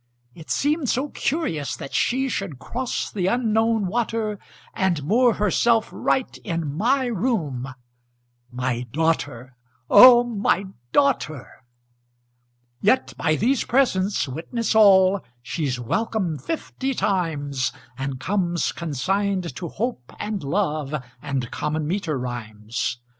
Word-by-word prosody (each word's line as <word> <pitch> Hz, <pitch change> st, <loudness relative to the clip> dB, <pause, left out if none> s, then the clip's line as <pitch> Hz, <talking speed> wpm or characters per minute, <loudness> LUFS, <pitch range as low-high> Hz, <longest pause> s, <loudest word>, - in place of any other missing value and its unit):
It 160 Hz, +3 st, -13 dB
seemed 295 Hz, -2 st, +1 dB
so 275 Hz, +4 st, 0 dB
curious 215 Hz, -, -2 dB
that 135 Hz, -, -8 dB
she 265 Hz, +2 st, +1 dB
Should 195 Hz, -, -3 dB
cross 240 Hz, -, -3 dB
the 185 Hz, -3 st, -1 dB
Unknown 225 Hz, -1 st, +2 dB
water, 220 Hz, 0 st, -1 dB, 0.3 s
And 175 Hz, -6 st, 0 dB
moor 235 Hz, -, +3 dB
herself 220 Hz, +3 st, +2 dB
right 260 Hz, -, -1 dB
in 165 Hz, -4 st, -3 dB
my 255 Hz, -, +2 dB
room, 170 Hz, -, -2 dB, 0.8 s
My 125 Hz, -1 st, -2 dB
daughter, 130 Hz, -5 st, -1 dB, 0.4 s
O 240 Hz, +3 st, +10 dB
my 205 Hz, -4 st, 0 dB, 0.3 s
daughter! 205 Hz, -, +1 dB, 1.3 s
Yet 220 Hz, +6 st, +2 dB
by 155 Hz, -1 st, +1 dB
these 245 Hz, -, +1 dB
presents 205 Hz, -, +1 dB
witness 190 Hz, -, -2 dB
all 195 Hz, -3 st, +6 dB, 0.2 s
She's 130 Hz, -1 st, -2 dB
welcome 185 Hz, -, -1 dB
fifty 270 Hz, -, -3 dB
times, 145 Hz, -, -1 dB, 0.2 s
And 135 Hz, 0 st, -4 dB
comes 175 Hz, -1 st, 0 dB
consigned 185 Hz, +4 st, -1 dB
to 170 Hz, -, -5 dB
Hope 220 Hz, -, -4 dB
and 210 Hz, -2 st, -3 dB
Love 150 Hz, -2 st, -1 dB, 0.3 s
And 135 Hz, -5 st, -3 dB
common 150 Hz, 0 st, -2 dB
meter 160 Hz, -3 st, -1 dB
rhymes. 120 Hz, -1 st, -4 dB
185 Hz, 115 wpm, -23 LUFS, 145-230 Hz, 1.3 s, O